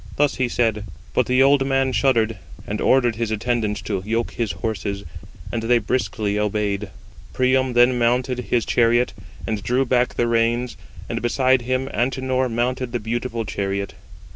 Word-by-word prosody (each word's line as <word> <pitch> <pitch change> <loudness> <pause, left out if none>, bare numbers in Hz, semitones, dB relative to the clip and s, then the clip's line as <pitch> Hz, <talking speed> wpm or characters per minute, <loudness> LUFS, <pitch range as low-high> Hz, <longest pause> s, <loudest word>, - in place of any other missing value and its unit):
Thus 145 -1 +1
he 130 -1 +1
said, 110 -4 0 0.3
but - - +2
the 125 +1 +4
old 140 0 +4
man 135 -1 +1
shuddered, 115 -1 +2 0.3
and 105 +1 -4
ordered 120 -4 +3
his 115 -1 -1
attendants 110 -1 -1
to 100 -3 -2
yoke 115 +3 -1
his 115 -4 -2
horses; 100 -1 -3 0.5
and 115 - -2
they 120 +2 +3
briskly 105 -2 -1
obeyed. 105 -1 -1 0.4
Priam 130 0 +2
then 120 +1 +4
mounted 125 +2 +1
his 120 -2 +1
chariot, 120 +1 +2 0.3
and 110 -2 -2
drew 125 +5 +1
back 125 0 +1
the 120 - +1
reins: 115 +1 +1 0.3
and - - -3
beside 130 +1 +2
him 130 +2 -1
Antenor 130 +1 0
mounted 120 +1 -1
the 120 - 0
beautiful 115 +1 -3
chariot. 100 -1 -3
120 Hz, 160 wpm, -22 LUFS, 110-130 Hz, 0.5 s, the